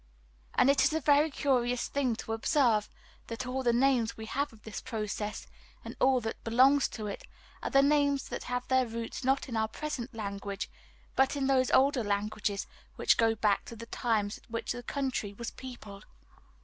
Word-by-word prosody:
And - - +5
it 280 - +3
is - - +3
a 320 - +1
very 295 +1 +4
curious 250 -4 0
thing 260 -5 0
to 225 - -5
observe 225 -3 +2 0.4
that 230 +2 -5
all 255 +1 -2
the 240 -2 +3
names 245 -2 +2
we 220 - -6
have 280 +6 -2
of 220 -2 -18
this 220 - -6
process, 215 -3 -4 0.4
and - - -7
all 260 -1 +4
that 225 0 -5
belongs 260 +5 +5
to 215 - -7
it, 205 - -6 0.3
are - - -2
names 285 -1 +2
that - - -5
have 250 0 -3
their 260 -1 +3
roots 230 +3 -5
not 270 +2 +1
in 240 - -5
our 220 0 +1
present 255 -1 -5
language, 200 -2 -4 0.4
but 265 +2 +3
in 275 -1 -1
those 265 -1 +3
older 265 -2 +4
languages 205 0 -1 0.3
which - - +4
go 225 -1 +3
back 210 -2 +2
to 230 - -9
the 230 +1 -8
times 220 -3 -1
at - - -27
which 230 0 -3
this 245 - -5
country 260 -7 -2
was 235 +2 -5
peopled. 215 -6 -10
240 Hz, 190 wpm, -30 LUFS, 220-270 Hz, 0.4 s, And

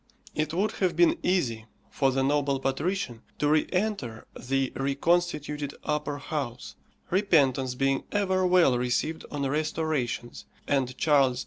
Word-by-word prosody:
It 155 0 -1
would 195 +6 0
have 180 -3 +2
been 175 +1 +4
easy 120 -12 0 0.2
for 135 - +2
the 135 +1 0
noble 140 0 +1
patrician 135 - -2 0.2
to 145 - +1
re 155 +1 +3
enter 180 - -2
the 135 0 -1
reconstituted 150 0 0
upper 150 -1 -2
house, 140 -4 -5 0.4
repentance 140 -9 +2
being 135 +1 0
ever 190 -2 +1
well 180 -9 +4
received 125 +6 -1
on 140 -2 -2
restorations, 150 -4 -2 0.2
and 130 -2 0
Charles 135 -5 +3
II. - - -3
145 Hz, 135 wpm, -27 LUFS, 135-170 Hz, 0.4 s, been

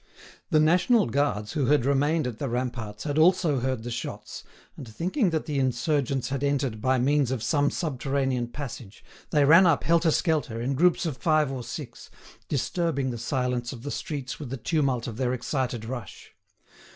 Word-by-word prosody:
The 155 -4 +4
national 180 +9 +4
guards 115 -5 -1
who 140 -4 0
had 145 -4 +3
remained 145 +3 +2
at 120 -3 -5
the 140 - -2
ramparts 120 -4 -4
had 150 0 -1
also 165 -4 +4
heard 130 -2 -2
the 120 - -5
shots, 120 +1 -6 0.3
and 130 - -9
thinking 180 - 0
that 160 -2 -2
the 145 -3 -1
insurgents 135 0 0
had 140 0 -2
entered 135 -6 0
by 130 +2 +2
means 140 +1 +2
of 130 -4 -2
some 145 +2 +2
subterranean 135 -4 -1
passage, 120 -5 -8 0.2
they 145 -2 +3
ran 165 +6 +7
up 165 -4 +2
helter 165 +1 +3
skelter, 150 -8 0
in 125 +4 -1
groups 175 +6 +3
of 150 -6 -3
five 155 0 +2
or 130 -2 -4
six, - - -8 0.4
disturbing 140 -1 -1
the 120 - -5
silence 125 0 -2
of 120 -2 -10
the 145 - -4
streets 140 -4 -5
with 145 -5 -6
the 135 - -4
tumult 135 -3 0
of 115 -2 -6
their 125 -1 0
excited 125 -2 -2
rush. 120 0 -8
135 Hz, 180 wpm, -26 LUFS, 125-155 Hz, 0.4 s, ran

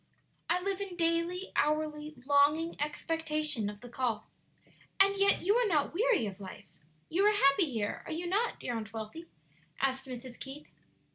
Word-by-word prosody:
"I 350 +2 +3
live 395 +1 -2
in 390 -3 -5
daily, 335 +2 0
hourly 305 0 0
longing 295 +4 +3
expectation 305 -5 0
of 205 0 -10
the 245 - -10
call." 240 -3 -1 0.7
"And 395 +1 +6
yet 395 0 +3
you 400 +4 +3
are - - +3
not 305 -7 +1
weary 430 - +2
of 200 -1 -6
life? 185 -3 -11 0.3
you 365 +5 +1
are 420 - +6
happy 275 -2 +4
here, 210 -4 -2
are - - -5
you 335 +3 -3
not, 410 +7 0
dear 245 - -3
Aunt 220 -1 -5
Wealthy?" 225 +10 -7 0.5
asked 265 0 0
Mrs. 250 -1 -8
Keith. 280 +3 -7
305 Hz, 165 wpm, -31 LUFS, 255-355 Hz, 0.7 s, And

